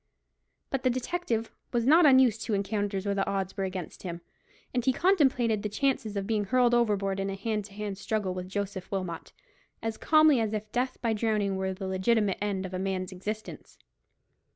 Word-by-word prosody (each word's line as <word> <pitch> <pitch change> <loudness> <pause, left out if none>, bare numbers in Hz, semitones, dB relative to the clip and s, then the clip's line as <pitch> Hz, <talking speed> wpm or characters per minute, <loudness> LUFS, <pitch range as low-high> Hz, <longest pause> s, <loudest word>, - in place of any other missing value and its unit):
But 270 - -1
the 255 - +2
detective 250 -2 -2 0.2
was 235 -2 0
not 315 +4 +7
unused 260 -5 +5
to 215 - 0
encounters 200 -1 -1
where 200 - +1
the 195 -1 0
odds 195 -1 -2
were 195 -1 -1
against 185 -3 -6
him, 170 -2 -6 0.5
and 250 -1 0
he 260 - +3
contemplated 260 - +2
the 210 - -2
chances 220 -2 -1
of 195 - -2
being 215 -1 0
hurled 245 +3 +3
overboard 200 -5 +1
in 195 0 -1
a 195 - -3
hand 210 +1 -2
to 200 - -13
hand 205 -1 -5
struggle 200 -2 -1
with 185 0 -6
Joseph 195 -1 -4
Wilmot 185 -4 -4 0.5
as 225 -1 -3
calmly 310 -4 +5
as 220 -1 -1
if 215 0 -4
death 255 +1 -1
by 230 -1 +2
drowning 210 -3 0
were 190 0 -1
the 190 +1 -6
legitimate 195 +2 +1
end 200 -2 -1
of 185 - -7
a 185 - -2
man's 190 -1 -2
existence. 210 +4 -7
210 Hz, 195 wpm, -28 LUFS, 195-235 Hz, 0.5 s, not